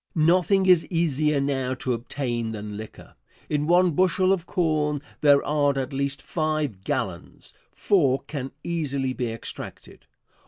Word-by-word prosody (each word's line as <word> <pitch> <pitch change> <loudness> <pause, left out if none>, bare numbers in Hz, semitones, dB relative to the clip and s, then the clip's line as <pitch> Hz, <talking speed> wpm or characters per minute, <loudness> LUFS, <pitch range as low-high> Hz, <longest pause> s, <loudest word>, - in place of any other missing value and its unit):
Nothing 180 +4 +3
is 180 -4 +5
easier 155 -4 +1
now 135 -2 -1
to 130 0 -2
obtain 120 -1 -3
than 105 -1 -6
liquor. 110 +1 -10 0.4
In 150 0 0
one 175 +1 +4
bushel 185 +3 +3
of 180 -2 -3
corn 155 -4 0 0.2
there 145 -2 +5
are 145 -2 +1
at 130 0 -3
least 140 +1 -2
five 155 - -2
gallons - - -4 0.2
four 140 -10 +2
can 135 -3 -5
easily 140 -6 -2
be 120 -3 -3
extracted. 115 - -9
145 Hz, 140 wpm, -25 LUFS, 130-165 Hz, 0.4 s, is